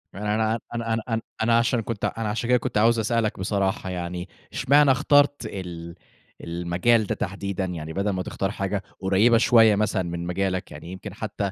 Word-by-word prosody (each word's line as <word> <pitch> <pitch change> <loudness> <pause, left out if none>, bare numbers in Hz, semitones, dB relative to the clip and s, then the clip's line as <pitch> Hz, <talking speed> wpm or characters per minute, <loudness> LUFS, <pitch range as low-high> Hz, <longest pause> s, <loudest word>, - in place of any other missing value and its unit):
أنا 105 +1 -2
أنا 110 +1 +1 0.3
أنا 110 - 0
أنا 115 -1 0 0.2
أنا 115 +1 +4
عشان 115 +1 +2
كنت 110 -1 -4
أنا 115 -2 -2
عشان 115 +3 -2
كده 125 - +5
كنت 115 - -3
عاوز 115 +2 +4
أسألك 110 -2 0
بصراحة 95 -1 -1
يعني 90 0 -5 0.2
اشمعنا 140 +1 +4
اخترت 145 +1 +3
ال 85 -5 -7 0.5
المجال 90 +7 +1
ده - - -1
تحديدًا 100 -1 -3
يعني 80 -3 -5
بدَل 100 +4 -1
ما 95 -2 -2
تختار 95 +1 -3
حاجة 100 0 -3 0.2
قُريبة 100 +5 +4
شوية 115 -2 +5
مثلًا 105 -2 0
من 85 0 -4
مجالك؟ 95 +1 -2
يعني 75 +4 -9
يمْكِن 95 +1 -8
حتى 100 -2 -3
100 Hz, 175 wpm, -24 LUFS, 95-115 Hz, 0.5 s, كده